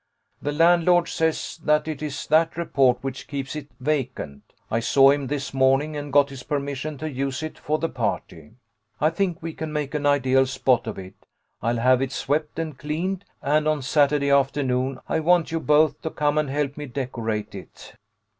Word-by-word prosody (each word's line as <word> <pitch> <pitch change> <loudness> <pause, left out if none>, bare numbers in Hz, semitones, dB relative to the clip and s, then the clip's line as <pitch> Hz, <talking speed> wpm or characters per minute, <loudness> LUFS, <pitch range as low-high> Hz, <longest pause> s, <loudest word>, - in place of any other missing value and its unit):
The 145 - -2
landlord 170 +2 +4
says 160 +1 -1
that 150 +1 +2
it 155 -2 -4
is 145 -3 -4
that 160 +2 +2
report 135 -7 +2
which 135 -1 -5
keeps 140 0 -5
it 150 -2 -6
vacant. 130 - -2 0.3
I 115 - +2
saw 135 +3 +5
him 140 -1 -1
this 140 -1 -3
morning, 135 +3 +2
and 145 -1 -5
got 140 0 +4
his 135 -2 -8
permission 145 +1 -3
to 155 - -4
use 135 +1 -3
it 155 - -6
for 155 +1 -1
the 165 - -1
party. 105 - -4 0.5
I 155 +2 +3
think 180 -1 -2
we 165 -1 -4
can 160 0 -5
make 150 -2 -3
an 145 -1 0
ideal 135 -2 +3
spot 130 -3 +1
of 110 - -4
it. 95 0 -11 0.3
I'll 120 +1 0
have 130 +2 +3
it 135 -1 -1
swept 150 +3 -2
and 160 -3 -3
cleaned, 175 +6 -3 0.2
and 150 +2 +2
on 155 -3 0
Saturday 140 +1 +2
afternoon 135 -2 +1
I - - 0
want 170 +1 +3
you 165 - 0
both 150 0 +3
to 160 - -3
come 150 -1 0
and 150 -2 -1
help 145 0 -2
me 150 -1 -6
decorate 120 -5 -3
it." - - -11
145 Hz, 190 wpm, -24 LUFS, 130-155 Hz, 0.5 s, saw